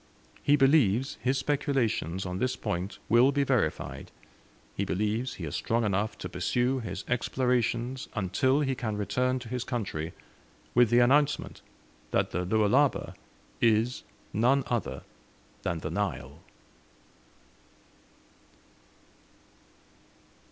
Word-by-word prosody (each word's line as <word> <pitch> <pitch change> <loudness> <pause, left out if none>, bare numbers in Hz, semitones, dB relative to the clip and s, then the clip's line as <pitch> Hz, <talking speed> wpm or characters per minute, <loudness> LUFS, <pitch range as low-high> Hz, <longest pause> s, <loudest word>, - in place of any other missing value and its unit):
He 145 - +4
believes 135 -4 +3
his 130 +2 +1
speculations 130 - 0
on 90 0 -4
this 130 0 0
point 90 -2 -3
will 120 +4 +5
be 140 0 +1
verified; 125 - -1 0.7
he - - -1
believes 105 +6 -1
he 85 - -6
is 75 - -4
strong 115 +1 0
enough 105 +1 0
to - - -5
pursue 120 +9 0
his 95 -5 -6
explorations 125 0 0
until 115 +8 +1
he 135 -2 0
can 110 -5 -3
return 125 +5 0
to 120 -2 -8
his 125 +1 -3
country, 95 - -3 0.6
with 120 -2 +5
the 120 - +4
announcement 145 +4 +2 0.5
that - - 0
the 90 - -1
Lualaba 110 +8 +2 0.5
is 115 +2 +2 0.3
none 130 +6 +3
other 95 - -3 0.6
than 85 - -2
the - - -4
Nile. 70 +5 -3
120 Hz, 115 wpm, -28 LUFS, 100-130 Hz, 0.7 s, will